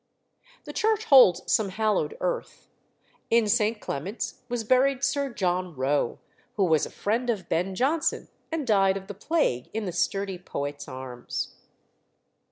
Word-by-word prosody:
The - - -8
church 440 0 +1
holds 190 - +7
some 215 -3 +2
hallowed 205 -6 0
earth: - - -3 0.6
in 230 -1 +4
St. 215 0 +2
Clement's 190 - -4
was 240 -2 -2
buried 260 +3 +3
Sir 280 -1 0
John 180 -5 -1
Roe, 135 -1 0 0.4
who 200 - +2
was 160 -4 +3
a - - -11
friend 235 +4 -1
of 210 -5 -1
Ben 185 +3 -1
Jonson, 295 - 0 0.2
and 320 -3 -2
died 195 -4 +3
of 195 - -8
the 205 - -7
plague 200 - 0
in 220 -1 -2
the 180 - -2
sturdy 195 +1 -1
poet's 145 -4 -5
arms. 130 -2 -5
200 Hz, 150 wpm, -26 LUFS, 175-245 Hz, 0.6 s, holds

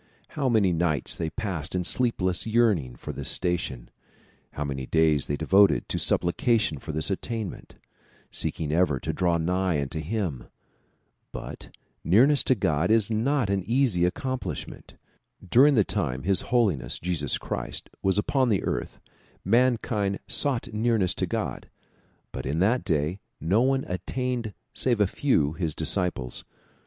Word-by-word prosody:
How 140 -3 -1
many 105 -6 +3
nights 80 -4 0
they 80 -2 -2
passed 95 -6 -4
in 90 - 0
sleepless 95 -3 0
yearning 105 - +2
for - - -7
this - - -3
station; 85 -9 -1 0.6
how 75 - -3
many 65 -2 -4
days 80 -3 +2
they 70 - -1
devoted 95 +6 +4
to - - -1
supplication 95 - +1
for 80 - -6
this 80 +5 -1
attainment, 110 0 -5 0.6
seeking 75 -2 -3
ever 80 -5 +2
to - - -3
draw 85 -2 +1
nigh 90 0 0
unto 70 +3 -3
him! 80 - -3 0.9
But - - -9 0.3
nearness 130 - +4
to 130 - +3
God 80 -4 0
is 110 0 +3
not 115 0 +1
an 100 -1 +1
easy 115 -3 +1
accomplishment. 130 +7 -4 0.5
During 135 +9 +6
the 105 - +5
time 65 -7 -2
His 95 +3 +2
Holiness 95 - +1
Jesus 80 -6 -1
Christ - - -5
was 95 +1 +1
upon 130 +4 +1
the 100 -4 +1
earth - - -3 0.5
mankind 110 -3 +2
sought 130 -5 +1
nearness 110 -4 +1
to - - -2
God, - - -4 0.6
but - - -5
in 70 +4 -1
that 110 +8 +2
day 80 +1 -1 0.2
no 95 +9 +2
one 135 +1 +1
attained 120 +3 -3 0.2
save 120 -4 +1
a 105 - +5
very 95 - -7
few, 80 - +2
his 80 -2 -2
disciples. 80 -6 -1
95 Hz, 145 wpm, -26 LUFS, 80-115 Hz, 0.9 s, During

